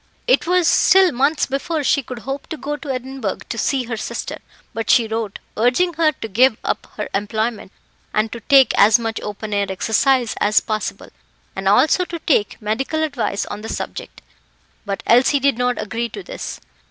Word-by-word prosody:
It - - +2
was 360 -1 +3
still 380 -2 +5
months 280 +4 +1
before 290 +3 -2
she 280 - +2
could 250 -1 -8
hope 270 +1 -5
to 320 - -6
go 295 +1 -4
to 295 -1 -9
Edinburgh 255 -5 -3
to - - -3
see 270 -2 0
her 230 -1 -5
sister; - - -5 0.3
but 225 0 -4
she 230 -2 +5
wrote, 220 -2 -3 0.2
urging 245 +11 +2
her 320 -1 +3
to 265 - -7
give 230 +3 +3
up - - -2
her 210 - -3
employment, 215 +1 -2 0.4
and 215 +1 0
to 235 - -6
take 270 +3 +5
as 215 +3 +7
much 225 -1 -4
open 210 +1 -6
air 200 0 +1
exercise 235 +5 +1
as 210 +1 +4
possible, 215 -1 -4 0.5
and 195 0 -3
also 265 - +4
to 345 - -6
take 275 - 0
medical 265 +9 -1
advice 265 -9 -2
on 205 - -7
the 225 - -7
subject; - - -6 0.6
but 200 -1 -3
Elsie 255 +4 +4
did 275 -3 +1
not 250 0 0
agree 225 +3 -3
to 400 - -8
this. - - -7
245 Hz, 185 wpm, -20 LUFS, 215-285 Hz, 0.6 s, as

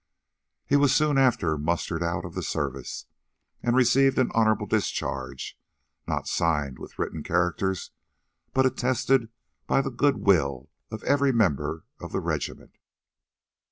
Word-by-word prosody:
He 145 - +2
was 145 -1 +4
soon 150 -2 +3
after 85 - +2
mustered 85 +2 -1
out 85 0 -1
of - - -8
the - - -3
service, 70 -4 -4 0.6
and 120 0 +1
received 130 +2 +4
an 130 - +2
honorable 110 -1 +2
discharge, 65 -2 -3 0.5
not - - -2
signed 75 -5 0
with - - -11
written 80 - -3
characters, 90 +3 -1 0.6
but 130 0 +3
attested 130 -1 +1 0.4
by 135 - +3
the 135 - -4
good 140 +2 +2
will 75 -9 +1 0.2
of 110 - -7
every 140 -1 +3
member 80 - 0
of - - -8
the - - 0
regiment. - - -4
100 Hz, 135 wpm, -26 LUFS, 80-130 Hz, 0.6 s, was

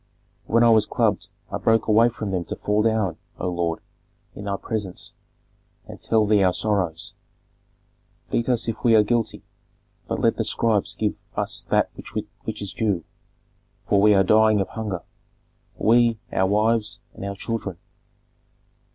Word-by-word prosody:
When 115 +1 +4
I 115 - +6
was 110 -2 +4
clubbed 105 -3 0 0.2
I 100 - -3
broke 115 0 +2
away 115 +2 +5
from 110 -4 -5
them 90 -2 -1
to - - -4
fall 105 +1 0
down, 110 -6 +1 0.2
O 90 - -3
lord, 85 -2 -2 0.5
in 100 - -9
thy 100 -1 -1
presence, 105 -5 -4 0.7
and - - -11
tell 110 -1 +2
thee 105 -1 +3
our 90 -2 +3
sorrows. 95 -7 -1 1.2
Beat 115 +1 0
us 120 -2 +1
if 115 -1 -4
we 115 -2 +5
are 105 - +6
guilty, 115 +1 -1 0.6
but - - -2
let - - +2
the - - 0
scribes 105 -3 0
give 105 0 0 0.2
us 105 -1 -1
that - - +2
which - - -7
is 100 - -5
due, 100 -7 0 0.8
for 100 - +3
we 105 0 +6
are 95 - +5
dying 110 +1 +4
of 95 - -1
hunger, 105 -6 -4 0.7
we, 115 0 +4 0.2
our 95 - +2
wives, 110 +2 +1
and - - -9
our 100 0 -4
children." 100 -4 -4
105 Hz, 160 wpm, -23 LUFS, 100-110 Hz, 1.2 s, I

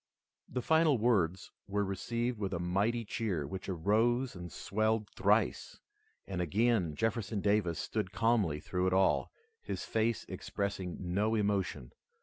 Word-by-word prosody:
The 125 0 -3
final 160 -3 +4
words 100 -6 +1 0.2
were 100 0 0
received 115 +5 -2
with 100 -2 -2
a - - -2
mighty 100 +7 0
cheer 100 -9 -2
which 95 +7 -6
rose 110 +8 +1
and 90 -1 -7
swelled 110 +5 0
thrice, - - +1 0.5
and 95 -2 -3
again. 95 -2 +1
Jefferson 110 0 -1
Davis 100 -5 +1
stood 90 - -2
calmly 110 -9 +2
through 90 +4 -1
it 95 - +1
all, 95 0 +3 0.3
his - - -4
face 115 0 0
expressing 100 -3 -3
no 100 +5 0
emotion. 100 -3 -1
100 Hz, 135 wpm, -32 LUFS, 90-115 Hz, 0.5 s, final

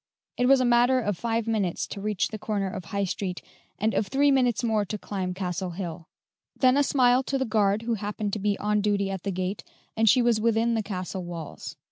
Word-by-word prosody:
It 250 - +1
was 270 0 +6
a 255 - +2
matter 245 +2 +4
of 205 -5 -1
five 230 +3 -1
minutes 210 -6 -1
to 200 - -6
reach 210 -2 -1
the 215 - -6
corner 205 -2 -2
of 185 -1 -6
High 200 +3 -2
Street, 185 -1 -3 0.3
and 220 +3 0
of 205 - 0
three 280 +5 +3
minutes 250 -3 +2
more 220 -3 +1
to 210 +2 -4
climb 185 -3 -4
Castle 185 -1 -3
Hill; 170 -2 -6 0.5
then 255 -1 +4
a 285 - +4
smile 255 -2 +4
to 270 +1 -2
the 265 - 0
guard 215 -2 +1
who 235 0 -1
happened 205 -1 -3
to 215 - -1
be 205 0 0
on 210 0 0
duty 200 -1 0
at 190 -2 -4
the 200 - -3
gate, 185 +2 -3 0.3
and 225 0 +4
she 250 +1 +5
was 235 -2 +2
within 230 +1 +2
the 225 - +1
castle 185 -2 -5
walls. 170 -3 -7
210 Hz, 225 wpm, -26 LUFS, 195-235 Hz, 0.5 s, was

